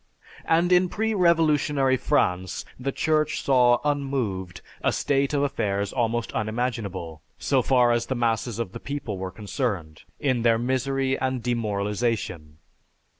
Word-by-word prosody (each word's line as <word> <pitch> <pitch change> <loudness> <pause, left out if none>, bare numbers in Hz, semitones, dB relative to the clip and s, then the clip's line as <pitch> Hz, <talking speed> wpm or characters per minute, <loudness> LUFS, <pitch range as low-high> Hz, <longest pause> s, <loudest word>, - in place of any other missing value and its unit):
And 170 +2 +2
in 180 0 +4
pre 220 +3 -1
revolutionary 150 -7 +3
France, 95 -10 0
the 135 +2 -2
Church 155 +1 0
saw 125 -3 +5
unmoved 130 -11 -2 0.2
a - - +3
state 140 -1 +1
of 145 -1 +1
affairs 100 -7 -1
almost 120 -1 -1
unimaginable, 110 -8 -3 0.2
so 135 -2 +1
far 125 -1 +3
as 120 0 0
the 130 - -1
masses 115 -1 0
of 115 -6 -3
the - - -7
people 135 -9 -5
were 95 0 -3
concerned, 100 - -4 0.2
in 130 -4 +1
their 115 -1 +4
misery 130 +2 0
and 130 -2 -1
demoralization. 105 -8 -2
120 Hz, 135 wpm, -25 LUFS, 105-140 Hz, 0.2 s, saw